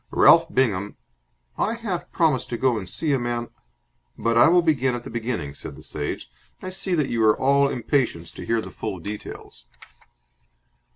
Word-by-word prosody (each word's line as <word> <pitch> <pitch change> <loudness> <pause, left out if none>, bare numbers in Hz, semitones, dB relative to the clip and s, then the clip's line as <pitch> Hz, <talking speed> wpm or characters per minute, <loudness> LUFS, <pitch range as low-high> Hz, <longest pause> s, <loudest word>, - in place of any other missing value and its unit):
Ralph 165 0 +6
Bingham...." 105 - 0 0.6
"I 225 - +1
half 205 -7 -4
promised 155 -7 +1
to 120 - -3
go 130 0 +2
and 95 -3 -7
see 150 - 0
a 135 - +2
man 120 0 -3 0.4
" - - -44
"But 115 0 +3
I 120 - +7
will 175 +1 +5
begin 135 -6 +2
at 120 - -6
the - - -9
beginning," 115 - -3
said - - -8
the - - -13
Sage. 75 -1 -4 0.3
"I 185 - -6
see 185 -1 -1
that 150 -5 0
you 115 -1 +1
are 110 -1 +5
all 140 +1 +3
impatience 120 - -1
to - - -9
hear 115 -1 0
the - - -9
full 105 -4 -5
details." 95 -9 -8
120 Hz, 185 wpm, -24 LUFS, 105-150 Hz, 0.6 s, I